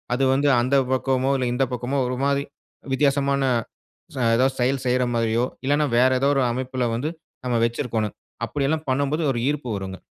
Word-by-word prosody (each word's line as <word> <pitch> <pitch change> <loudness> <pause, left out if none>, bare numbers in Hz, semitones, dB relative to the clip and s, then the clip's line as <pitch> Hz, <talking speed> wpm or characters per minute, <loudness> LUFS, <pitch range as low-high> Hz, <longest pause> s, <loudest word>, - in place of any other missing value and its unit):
அது 135 - 0
வந்து 140 +2 +2
அந்த 130 +3 +1 0.2
பக்கமோ 130 0 +1
இல்ல 130 -1 -1
இந்த 130 +2 +1
பக்கமோ 125 +3 -2
ஒரு 125 0 -3
மாதிரி 140 0 +1 0.5
வித்தியாசமான, 140 0 +2 0.7
ச - - -8 0.2
ஏதாவது 130 +2 +2
செயல் 130 +2 +1
செய்ற 125 +1 +2
மாரியோ 115 +1 +1 0.2
இல்லன்னா 145 +2 +2
வேற 130 +2 +5
ஏதோ 135 - +2
ஒரு 135 - +3
அமைப்புல 130 +1 -2
வந்து 135 +7 -2 0.4
நம்ம 125 -1 0
வச்சுருக்கணும். 115 -3 -2 0.3
அப்டியெல்லாம் 150 +2 -1
பண்ணும்போது 140 +4 0
ஒரு 120 - -2
ஈர்ப்பு 145 -4 -3
வருங்க. 95 -1 -5
130 Hz, 165 wpm, -23 LUFS, 125-140 Hz, 0.7 s, வேற